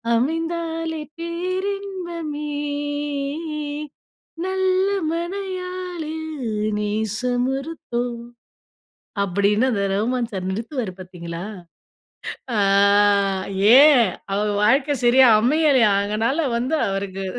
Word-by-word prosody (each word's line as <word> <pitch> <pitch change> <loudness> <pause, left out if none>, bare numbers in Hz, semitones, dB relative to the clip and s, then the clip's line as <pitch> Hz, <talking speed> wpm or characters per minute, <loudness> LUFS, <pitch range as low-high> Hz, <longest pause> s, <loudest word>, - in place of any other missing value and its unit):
அமைந்தாலே 325 +3 -2 0.2
பேரின்பமே. 345 -3 -4 1.9
நல்ல 375 0 +1 0.3
மணயாளில் 360 -3 -4 0.5
நேசமொருத்தோ" 245 +6 -2 1.2
அப்படின்னு 200 +4 +2
அந்த 200 -4 0
ரகுமான் 235 +4 0
சார் 185 -1 -4
நிறுத்துவாரு 225 0 -3
பாத்தீங்களா? 170 -2 -7 1.1
அ - - +1 1.2
ஏன், 275 -7 +7 0.2
அவர் 210 +1 0
வாழ்க்க 275 +6 +3
சரியா 255 +1 +6
அமையலையாம், 255 -6 +4
அதனால 225 +8 0 0.2
வந்து 255 +7 -1
அவருக்கு 195 0 -3
270 Hz, 70 wpm, -22 LUFS, 215-335 Hz, 1.9 s, ஏன்